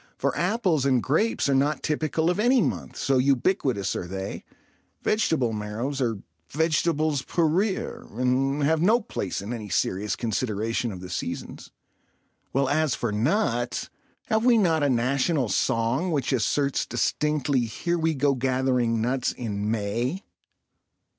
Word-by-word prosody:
For - - 0
apples 180 - +1
and 130 -3 +2
grapes 185 - +1
are 140 - +2
not 145 +3 +1
typical 160 +2 0
of 180 - -3
any 245 +4 +4
month, - - -2
so 135 -1 +2
ubiquitous 130 - +1
are 90 - -4
they, 95 +2 -5 0.6
vegetable 160 - +1
marrows 110 +7 -3
are 115 -4 0 0.3
vegetables 155 -1 +1
pour 165 +3 +1
rire 190 +5 -1
and 135 +3 +1
have 160 +2 +2
no 220 +7 +4
place 100 - -4
in 110 +4 -4
any 110 -3 -6
serious 95 +3 0
consideration 115 0 -1
of 90 -2 -8
the 90 - -8
seasons, - - -5 0.8
while 135 0 +1
as 155 -1 +1
for 120 - -2
nuts, 120 - 0 0.3
have 220 0 +1
we 245 -1 +5
not 165 -7 +3
a 145 - +2
national 130 +2 +1
song 115 - +1
which 140 -5 0
asserts 140 +4 +1
distinctly, 140 0 0
"Here 170 +10 -2
we 160 -1 +1
go 140 +1 +2
gathering 125 -3 +1
nuts 125 +2 0
in 105 -3 -3
May"? 115 - -1
135 Hz, 145 wpm, -25 LUFS, 115-160 Hz, 0.8 s, we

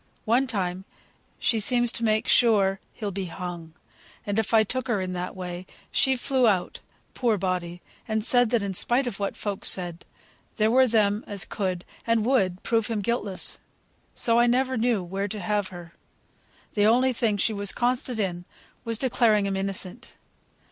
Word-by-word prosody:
One 245 +5 +2
time 190 -5 -2 0.5
she 225 - +1
seems 240 +2 +1
to 235 - -5
make 215 -1 +1
sure 200 -5 +4
he'll 210 -3 -5
be 195 0 -3
hung; 170 -2 -7 0.5
and 205 +1 0
if 220 - -1
I 220 -1 +6
took 255 +3 -2
her 230 -4 +1
in 185 -1 -3
that 180 +2 -4
way, 180 0 -6 0.2
she 265 -1 +3
flew 260 -1 +2
out 190 -4 0 0.3
(poor 235 -4 +1
body!) 180 -2 -3 0.2
and 220 -1 -1
said, 245 -2 +4
that 235 -3 +1
in 195 -1 -3
spite 240 +8 +3
of 225 -5 -5
what 200 -1 -2
folk 200 -2 -4
said, 175 -2 0 0.5
there 215 0 +2
were 260 +1 +5
them 215 -2 +2
as 200 -3 0
could, 185 -3 -3 0.2
and 230 -2 +2
would 195 -8 +1
prove 225 -2 +1
him 225 -3 -2
guiltless. 205 -3 -2 0.6
So 230 0 +2
I 240 - +5
never 260 +2 +1
knew 230 -4 +1
where 195 +3 -3
to 210 +1 -5
have 205 +1 -1
her. 175 -2 -11 0.8
The 205 0 +3
only 250 +3 +4
thing 225 -3 0
she 220 +2 +1
was 200 -1 +1
constant 245 -1 -1
in, 175 -3 -2 0.4
was 230 -1 -2
declaring 230 -5 +2
him 195 -1 -1
innocent." 195 +4 -4
210 Hz, 175 wpm, -26 LUFS, 190-235 Hz, 0.8 s, I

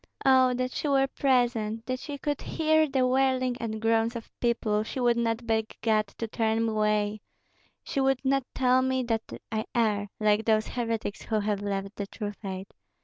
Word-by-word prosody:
"Oh 260 -1 +5
that 255 +1 -1
she 300 - -3
were 270 -1 +4
present, 240 -5 0
that 255 0 -2
she 290 +1 -6
could 290 0 -2
hear 315 -1 +2
the 265 -1 +2
wailing 255 -1 +2
and 220 -1 -3
groans 225 +1 +1
of 230 - -7
people, 225 -3 +1
she 220 +4 -5
would 240 -1 +3
not 230 0 -1
beg 220 -1 -1
God 215 -2 +2
to 230 - -3
turn 225 0 0
me 225 - 0
away, 210 -1 0 0.6
she 275 - -3
would 270 0 +1
not 275 0 +2
tell 255 0 +4
me 260 0 0
that 225 -2 0 0.3
I 220 0 -1
err, 210 -3 +1
like 215 0 +2
those 215 -1 +2
heretics 230 -3 -3
who 220 -1 -1
have 205 -1 -1
left 195 0 -3
the 200 - -3
true 205 +1 -5
faith. 195 -2 -7
230 Hz, 190 wpm, -28 LUFS, 215-255 Hz, 0.6 s, Oh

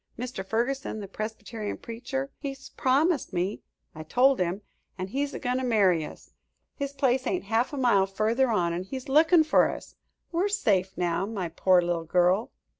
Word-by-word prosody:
Mr. 250 -5 -5
Ferguson, 235 +3 -2
the 200 - -6
Presbyterian 215 +1 -5
preacher 265 +4 -5
he's 275 -1 -7
promised 285 +4 +1
me 180 +4 -1 0.3
I 155 - -8
told 255 +11 +3
him 180 +3 -1 0.3
an' 185 0 -4
he's 280 +5 -1
a - - -2
goin' 250 -1 -1
to 260 - -2
marry 195 -9 +3
us. - - -11 0.4
His 280 -1 -3
place 265 -2 +1
ain't 365 - -1
half 225 +4 0
a 290 - -5
mile 230 -7 +3
further 220 +6 +1
on, 175 -6 +1
an' 175 - -2
he's 260 +6 -7
lookin' 320 +4 +5
fer 310 - +4
us. - - -8 0.4
We're 350 +4 +1
safe 195 - +1
now, 175 +2 0
my 195 -6 -3
poor 180 +2 +3
little 170 -1 -1
girl." 180 +6 +2
225 Hz, 180 wpm, -27 LUFS, 190-270 Hz, 0.4 s, lookin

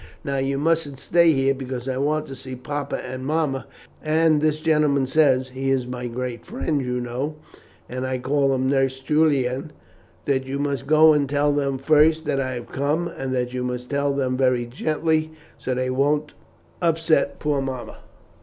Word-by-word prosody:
Now, 140 -3 -2
you 135 +1 0
mustn't 150 -2 0
stay 170 +1 +4
here, 135 -2 +2
because 130 -2 -6
I 130 -1 -1
want 150 +3 0
to 135 - -8
see 130 0 -8
papa 140 +3 -4
and 130 0 -6
mamma; 145 -2 -1 0.4
and 155 0 +3
this 155 0 +1
gentleman 150 -4 +2
says 130 -2 +3
he 135 +1 -3
is 135 -2 +1
my 125 0 -5
great 120 -1 -5
friend, 160 - -2
you 125 0 -2
know, 125 +5 -3 0.5
and 130 +1 -4
I 130 0 -1
call 135 +1 +1
him 130 0 -1
Nurse 135 -1 +1
Julian 140 -1 +1 0.5
that 135 -2 +1
you 135 +1 -3
must 140 -2 -2
go 155 +1 +7
and 145 -2 +1
tell 145 0 +2
them 140 -2 0
first 155 +3 +3
that 135 - 0
I 130 -1 -1
have 120 -1 -7
come, 150 +5 0
and 135 -1 -5
that 125 0 -1
you 125 0 -2
must 125 0 -4
tell 140 0 +1
them 130 -2 0
very 125 -2 +2
gently, 155 +5 -1 0.3
so 130 - -2
that 130 0 -1
it 130 - -1
won't 145 +3 +1 0.5
upset 165 -2 +2
poor 145 -2 0
mamma." 130 -2 -5
140 Hz, 185 wpm, -23 LUFS, 130-150 Hz, 0.5 s, go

